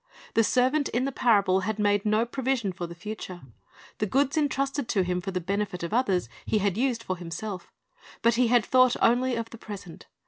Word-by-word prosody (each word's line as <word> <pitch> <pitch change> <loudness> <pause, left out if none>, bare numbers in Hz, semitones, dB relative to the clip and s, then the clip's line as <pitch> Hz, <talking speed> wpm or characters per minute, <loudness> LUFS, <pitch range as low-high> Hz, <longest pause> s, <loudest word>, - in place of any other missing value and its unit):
The 225 - +4
servant 260 +6 +2
in 245 +3 0
the 275 - -1
parable 200 -7 +3
had 210 +3 -2
made 205 0 +1
no 215 +2 +3
provision 240 -5 -1
for 175 -1 -5
the 170 - -9
future. 185 -1 -7 0.6
The 210 - 0
goods 275 - +1
entrusted 275 -3 0
to 195 -4 +2
him 180 0 -1
for 195 - -5
the 185 -1 -2
benefit 195 0 -3
of 170 - -4
others 195 - +1 0.2
he 215 - 0
had 200 -2 +1
used 240 -1 0
for 185 - -3
himself; 180 +2 -6 0.5
but 235 - +5
he 240 +1 +3
had 240 -1 +3
thought 255 -1 +4
only 245 +2 +3
of 230 0 -4
the 230 - -10
present. 200 -6 -9
215 Hz, 205 wpm, -27 LUFS, 190-250 Hz, 0.6 s, but